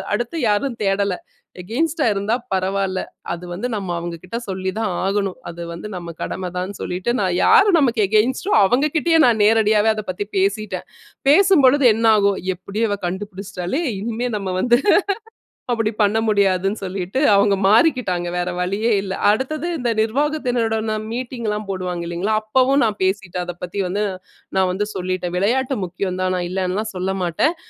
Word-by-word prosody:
அடுத்து 240 +8 -3
யாரும் 235 +4 0
தேடல. 195 -1 +1 0.5
அகைன்ஸ்ட்டா 295 - -1
இருந்தா 205 +3 0 0.2
பரவாயில்ல. 190 0 0 0.3
அது 175 +1 -7
வந்து 200 +8 -3
நம்ம 195 -3 -4
அவங்ககிட்ட 170 +6 -6
சொல்லிதான் 190 +2 -2
ஆகணும். 195 -1 -1
அது 170 0 -8
வந்து 170 +5 -7
நம்ம 170 -2 -6
கடமதான்னு 185 +1 -4
சொல்லிட்டு, 180 +6 -2
நான் 185 -3 0
யாரு 405 0 +6
நமக்கு 240 -5 +2
அகைன்ஸ்ட்டோ 235 - +1
அவங்ககிட்டயே 305 - +2
நான் 225 -4 +3
நேரடியாவே 220 0 +4
அதப்பத்தி 205 -1 -4
பேசிட்டேன். 200 +2 -1 0.4
பேசும்பொழுது 290 -6 +5
என்ன 225 +1 -1
ஆகும்? 200 -1 +2 0.2
எப்படியோ 205 +5 -2
இவ 205 - -1
கண்டுபிடிச்ட்டாளே! 195 - -4 0.2
இனிமே 235 +3 -2
நம்ம 195 -2 -4
வந்து 240 0 +4 0.9
அப்டி 225 -2 0
பண்ண 210 +2 +3
முடியாதுன்னு 195 -1 +2
சொல்லிட்டு 190 +4 -3
அவுங்க 200 0 +4
மாறிக்கிட்டாங்க, 210 - +3
வேற 180 0 -1
வழியே 200 +6 0
இல்ல. 190 -1 -4 0.2
அடுத்தது 270 +10 0
இந்த 245 -4 -1
நிர்வாகத்தினருடன் 235 -3 0 0.2
மீட்டிங்லாம் 230 -4 -3
போடுவாங்க 180 -2 -3
இல்லீங்களா? 175 +5 -2
அப்பவும் 260 +5 +2
நான் 215 -2 0
பேசிட்டேன், 185 -2 -1
அதப்பத்தி 175 +2 -6
வந்து 200 +4 -1 0.5
நான் 190 -1 +3
வந்து 205 +3 -1
சொல்லிட்டேன். 185 -1 -3
விளையாட்டு 255 +7 +1
முக்கியம்தான், 185 +1 -2
நான் 175 -1 -2
இல்லன்லா 185 +2 -1
சொல்லமாட்டேன். 185 - 0
205 Hz, 135 wpm, -20 LUFS, 185-235 Hz, 0.9 s, யாரு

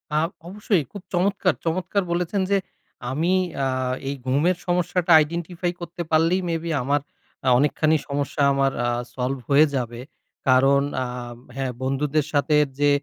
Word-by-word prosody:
আ - - +3 0.3
অবশ্যই। 200 -3 0
খুব 200 - -8
চমৎকার, 185 +1 +2
চমৎকার 185 +4 0
বলেছেন 180 +3 0
যে, 200 - +5 0.5
আমি 165 +7 +1 0.3
আ - - +2 0.4
এই 140 - -2
ঘুমের 155 +7 +2
সমস্যাটা 175 0 +1
identify 170 +2 -3
করতে 175 0 -6
পারলেই 165 +4 +3
মে 165 - 0
বি 170 - -4
আমার 145 +2 +1 0.4
আ - - 0
অনেকখানি 155 +3 +2
সমস্যা 140 +1 -2
আমার 135 0 +2 0.2
আ - - +1 0.3
সল্ভ 130 +1 -1
হয়ে 145 +3 +6
যাবে। 120 -2 -3 0.5
কারণ 135 +2 +5 0.2
আব 125 -1 -6 0.2
হ্যাঁ, 135 -2 -2
বন্ধুদের 140 +3 0
সাথে 150 +1 +2 0.2
যে 145 0 +4
155 Hz, 145 wpm, -23 LUFS, 135-175 Hz, 0.5 s, হয়ে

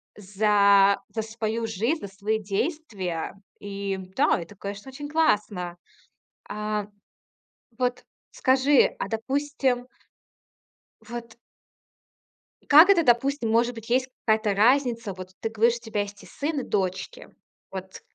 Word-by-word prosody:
за 200 0 +4
за 225 - -1
свою 220 +1 -3
жизнь, 225 - -1
за 200 - -7
свои 205 +3 -2
действия. 200 - -3 0.3
И 200 -1 -4 0.2
да, 290 +3 +3
это, 205 +5 -11
конечно, 200 +4 -7
очень 290 +2 -8
классно. 210 - +1 0.7
А, 210 0 -3 0.9
вот, 250 0 -1 0.3
скажи, 265 +1 +3
а - - -2
допустим 265 +1 -1 1.2
Вот. 235 -1 -7 1.3
Как 310 +6 +8
это, 360 -4 +5
допустим, 250 -1 +2
может 235 +2 +2
быть, 225 -1 -10
есть 255 +2 +2 0.2
какая-то 220 -2 +2
разница? 230 -1 +2
Вот 185 0 -9
ты 225 - -2
говоришь, 230 +2 +2
у - - -12
тебя 225 -3 -2
есть 205 0 -7
и - - -12
сын, 295 +1 -3
и - - -3
дочки. 190 -3 -3 0.4
Вот, 190 0 -8
225 Hz, 125 wpm, -25 LUFS, 200-260 Hz, 1.3 s, Как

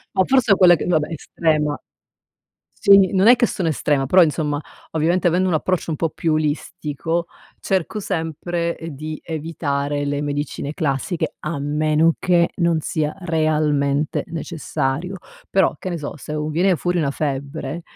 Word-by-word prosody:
Ma 190 - +4
forse 260 -2 +3
è - - +4
quella 180 -2 +7
che - - -4
vabbè, 160 -2 +1
estrema. 150 -1 0 1.0
Sì, 195 -3 +5
non 190 +2 +4
è 245 - +8
che 240 - +3
sono 180 -6 -2
estrema, 145 -3 +1
però 180 +7 +6
insomma, 150 -2 0 0.3
ovviamente 170 +3 +1
avendo 180 +2 +2
un 175 - +1
approccio 170 +2 -1
un 155 - -1
po' 165 +2 -1
più 155 0 0
olistico, 155 +2 -2 0.3
cerco 190 +2 -1
sempre, 170 -1 -2
ehm, 165 - -7
di 155 +2 -6
evitare 145 -3 -2
le 145 0 -1
medicine 145 0 -3
classiche, 155 +2 -2
a 155 -1 -3
meno 155 +3 +2
che 175 -2 +2
non 170 -2 +2
sia 155 -1 -2
realmente 150 -4 0
necessario. 165 +1 -3 0.3
Però, 190 -5 +3
che - - -5
ne 170 - -3
so, 145 -1 -6
se 150 +1 -7
u 150 0 -2
viene 180 +4 +2
fuori 175 +2 -1
una 150 -4 +1
febbre, 140 +2 -4
160 Hz, 160 wpm, -21 LUFS, 150-175 Hz, 1.0 s, è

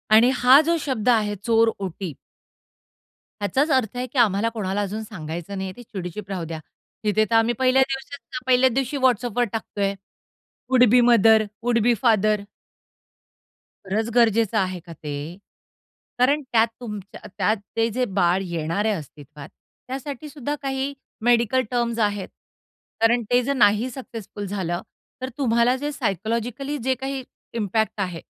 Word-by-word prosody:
आणि 230 +3 +7
हा 255 +3 +7
जो 335 - +3
शब्द 250 -5 -1
आहे 210 -3 +2
चोरओटी 200 -7 0 1.3
ह्याचाच 265 +9 +1
अर्थ 245 -3 +1
आहे, 250 - -1
की 260 - -9
आम्हाला 220 0 +3
कोणाला 205 -3 -2
अजून 205 +2 -3
सांगायचं 175 -2 -6
नाही 190 0 -3
आहे, 185 - -10
ती 245 - -10
चिडीचूप 190 -1 -7
राहू 185 -4 -3
द्या. 160 -1 -6 0.4
तिथे 215 +1 +2
तर 230 - +2
आम्ही 225 +1 +4
पहिल्या 260 +1 +4
दिवशी 270 -1 -6
पहिल्याच 255 0 +5
दिवशी 270 +2 -1
WhatsAppवर 245 -2 +2
टाकत 220 -2 -5
आहे. 200 0 +1 0.8
Would 255 -1 +5
B 245 +2 +6
mother, 220 -1 +6 0.2
would 240 -1 +2
B 245 - +4
father. 215 -3 +3 1.4
खरंच 220 +4 -1
गरजेचं 230 -2 +3
आहे 185 -3 0
का 170 0 -11
ते? 150 +3 -6 0.8
कारण 280 +4 +3
त्यात 225 -1 +4
तुमच्या 210 -4 -7 0.2
त्यात 215 - +2 0.2
ते 225 0 +2
जे 255 - +1
बाळ 175 +2 +3
येणार 170 +4 -2
आहे 220 - +2
अस्तित्वात, 145 -1 -10 0.4
त्यासाठीसुद्धा 285 +2 -5
काही, 270 0 -2 0.3
मेडीकल 240 +1 +3
टर्म्स 235 -1 0
आहेत. 205 -3 0 0.7
कारण 235 +1 +4
ते 245 0 +5
जर 280 +3 0
नाही 215 -1 +3
सक्सेसफुल 225 -5 -8
झालं, 180 -3 -2 0.4
तर 260 - -3
तुम्हाला 235 -1 +3
जे 290 +2 -3
सायकॉलॉजिकली 235 - -2
जे 260 0 0
काही 270 +1 -4 0.3
इम्पॅक्ट 220 0 -1
आहे, 180 -3 -3
225 Hz, 150 wpm, -23 LUFS, 200-250 Hz, 1.4 s, आणि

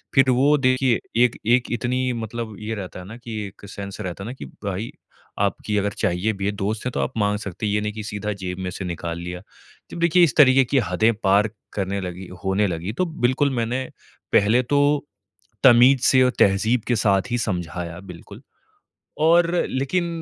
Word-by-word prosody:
फिर 135 -1 +5
वो 140 +4 +4
देखिए 130 -2 +2 0.2
एक 125 - +2
एक 120 +2 +3
इतनी 125 +2 -1
मतलब 115 -1 -5
ये 110 +1 -4
रहता 95 -3 -7
है 90 - -9
ना 110 - -9
कि 120 -2 -8
एक 100 - -14
सेंस 100 0 -7
रहता 95 -1 -5
है - - -7
ना, - - -5
कि 135 - -9
भाई 100 +2 -5 0.5
आपकी 105 - -1
अगर 100 0 0
चाहिए 90 +5 0
भी 95 -1 -5
है, 100 - +1
दोस्त 105 +3 -3
है, 125 - -1
तो - - -3
आप 125 - -1
माँग 105 -1 +1
सकते 100 0 -6
हैं। 105 - 0
ये 105 - +1
नहीं 105 0 -3
की 110 0 -6
सीधा 105 0 -4
जेब 95 -2 -6
में 95 -1 -3
से 95 +1 -6
निकाल 85 -1 -4
लिया। 90 +1 -6 0.5
तो - - -8
देखिए 170 +1 +4
इस 155 -8 +2
तरीके 135 -2 +7
की 135 +3 +2
हदें 115 +1 +3
पार 100 +2 +3 0.2
करने 100 0 -2
लगी 90 0 -6 0.2
होने 95 +2 +1
लगी 90 +4 -4
तो 185 +10 0 0.2
बिल्कुल 135 +3 +2
मैंने 120 +2 -1 0.5
पहले 110 +5 +4
तो 140 +4 +1 0.8
तमीज़ 125 0 +7
से 130 -1 +5
और 125 - +3
तहजीब 110 +4 +3
के 120 - +2
साथ 105 +2 +1
ही 120 - +1
समझाया 85 -5 -4
बिल्कुल। 100 +6 -12 0.9
और 170 +1 +4 0.2
लेकिन 140 +7 -1
110 Hz, 200 wpm, -22 LUFS, 95-125 Hz, 0.9 s, तरीके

